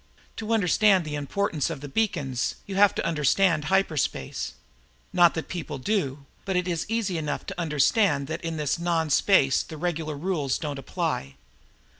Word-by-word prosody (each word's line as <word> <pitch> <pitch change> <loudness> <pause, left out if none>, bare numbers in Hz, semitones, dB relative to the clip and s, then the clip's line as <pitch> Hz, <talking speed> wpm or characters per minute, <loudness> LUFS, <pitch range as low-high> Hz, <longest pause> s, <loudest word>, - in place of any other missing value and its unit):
To 225 0 -4
understand 200 -2 +4
the 150 - -5
importance 150 +2 -1
of 165 -4 -5
the 145 - -7
beacons, 145 - -1
you 200 - -6
have 200 0 +5
to - - -2
understand 160 +1 +2
hyperspace. 170 -4 0 0.6
Not 175 -2 +5
that 160 - -2
many - - -13
people 170 -6 -5
do, 140 -3 -2 0.2
but 190 - -2
it 180 0 +1
is 170 -3 -2
easy 215 -7 -1
enough 150 -1 -3
to 175 - -5
understand 150 - +2
that 160 +3 -5
in 165 -1 -3
this 150 +2 -1
non 165 -3 0
space 140 -5 +4
the 160 - -9
regular 160 -2 -2
rules 150 -5 -1
don't 145 -3 -4
apply. 70 - -3
165 Hz, 170 wpm, -26 LUFS, 145-190 Hz, 0.6 s, have